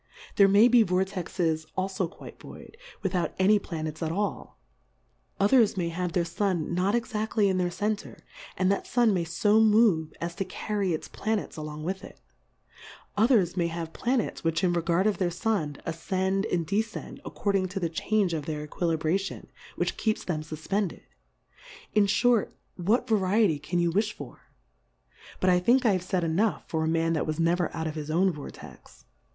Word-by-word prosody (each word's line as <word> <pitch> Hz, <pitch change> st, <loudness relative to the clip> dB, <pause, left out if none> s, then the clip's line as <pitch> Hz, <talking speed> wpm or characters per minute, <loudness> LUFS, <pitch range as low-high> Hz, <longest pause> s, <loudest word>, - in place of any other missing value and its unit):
There 200 Hz, -, +6 dB
may 205 Hz, +4 st, +6 dB
be 245 Hz, -1 st, +6 dB
Vor 185 Hz, -2 st, +2 dB
texes 170 Hz, -4 st, -2 dB
alfo 190 Hz, -2 st, -1 dB
quite -, -, -12 dB
void, -, -, -12 dB, 0.3 s
without 180 Hz, -3 st, -1 dB
any 205 Hz, +3 st, +4 dB
Pla 165 Hz, -5 st, -6 dB
nets 155 Hz, +1 st, -5 dB
at 160 Hz, -1 st, -1 dB
all; 200 Hz, +1 st, -3 dB, 0.8 s
others 215 Hz, 0 st, +4 dB
may 170 Hz, -2 st, 0 dB
have 180 Hz, +1 st, -3 dB
their 175 Hz, -3 st, +1 dB
Sun 175 Hz, -1 st, -1 dB
not 185 Hz, +5 st, +1 dB
exaftly 220 Hz, -2 st, 0 dB
in 185 Hz, -, 0 dB
their 180 Hz, -1 st, +1 dB
Center; 210 Hz, +4 st, -3 dB, 0.4 s
and 185 Hz, 0 st, +2 dB
that 200 Hz, -, -1 dB
Sun 240 Hz, -3 st, +3 dB
may 180 Hz, -3 st, 0 dB
fo 205 Hz, +6 st, +2 dB
move, 210 Hz, -8 st, +4 dB
as 170 Hz, 0 st, -3 dB
to 195 Hz, -, -2 dB
carry 200 Hz, 0 st, -2 dB
its 160 Hz, -, -3 dB
Pla 220 Hz, +1 st, -2 dB
nets 205 Hz, -, -5 dB
along 155 Hz, -1 st, -6 dB
with 190 Hz, +3 st, -3 dB
it: -, -, -12 dB, 1.0 s
Others 210 Hz, -5 st, +3 dB
may 175 Hz, -2 st, +1 dB
have 165 Hz, -1 st, -5 dB
Planets, 245 Hz, -1 st, -1 dB
which 165 Hz, 0 st, 0 dB
in 175 Hz, -1 st, +3 dB
regard 170 Hz, +2 st, +1 dB
of 215 Hz, -2 st, +1 dB
their 180 Hz, -2 st, +1 dB
Sun, 175 Hz, -5 st, -1 dB
afcend, 190 Hz, +4 st, -1 dB
and 170 Hz, -2 st, 0 dB
defcend, 210 Hz, +5 st, -3 dB
according 195 Hz, -2 st, -1 dB
to 195 Hz, +2 st, -4 dB
the 175 Hz, -, 0 dB
change 185 Hz, +3 st, 0 dB
of 150 Hz, -3 st, -3 dB
their 150 Hz, -1 st, -3 dB
Equilibration, 165 Hz, +4 st, -2 dB, 0.2 s
which -, -, -2 dB
keeps 220 Hz, -1 st, 0 dB
them 160 Hz, -4 st, -2 dB
fufpended. 160 Hz, +6 st, -3 dB, 0.9 s
In 210 Hz, -1 st, +4 dB
iliort, 235 Hz, +2 st, +2 dB, 0.2 s
what 205 Hz, +7 st, +1 dB
Variety 200 Hz, -5 st, +2 dB
can 165 Hz, +4 st, -3 dB
you 170 Hz, -1 st, +2 dB
willi 210 Hz, +5 st, +2 dB
for? 145 Hz, -11 st, -10 dB, 1.0 s
But, 185 Hz, -, +3 dB
I 180 Hz, -, +4 dB
think, 245 Hz, +8 st, +3 dB
I 220 Hz, -, +5 dB
have 185 Hz, -2 st, +1 dB
faid 185 Hz, -1 st, -1 dB
enough 180 Hz, +7 st, +1 dB
for 160 Hz, -1 st, -1 dB
a -, -, 0 dB
Man 165 Hz, 0 st, +1 dB
that 160 Hz, -, -1 dB
was 155 Hz, +1 st, -2 dB
never 170 Hz, +1 st, +1 dB
out 160 Hz, +1 st, -4 dB
of 160 Hz, -, -2 dB
his 155 Hz, -1 st, -6 dB
own 185 Hz, +4 st, +3 dB
Vortex. 145 Hz, -, -11 dB
185 Hz, 180 wpm, -27 LUFS, 165-205 Hz, 1.0 s, There